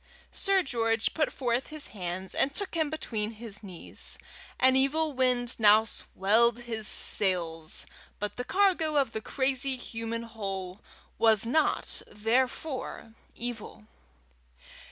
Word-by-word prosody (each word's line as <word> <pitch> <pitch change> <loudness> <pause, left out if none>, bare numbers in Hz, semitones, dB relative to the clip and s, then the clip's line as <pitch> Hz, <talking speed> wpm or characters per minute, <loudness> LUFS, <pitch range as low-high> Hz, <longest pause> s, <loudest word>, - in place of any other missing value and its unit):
Sir 390 -2 +3
George 225 -3 +1
put 310 -3 +1
forth 245 -1 -1
his 310 -2 -8
hands 185 -1 -4
and 275 +1 +1
took 405 - -2
him 320 -3 +1
between 225 -8 -3
his 215 -2 -5
knees. 185 -5 -1 0.4
An 260 0 +5
evil 295 +3 +2
wind 250 -2 +1
now 215 0 +7
swelled 225 +3 +2
his 225 -3 -4
sails, 165 -5 0 0.3
but 210 0 -3
the 250 - -3
cargo 360 -2 +2
of 275 -5 +3
the 220 - -4
crazy 265 +1 0
human 230 -1 -4
hull 195 -4 -5 0.4
was 220 -2 +5
not 310 +7 +1
therefore 245 +2 -1 0.2
evil. 225 -2 -6
235 Hz, 125 wpm, -29 LUFS, 210-270 Hz, 0.4 s, now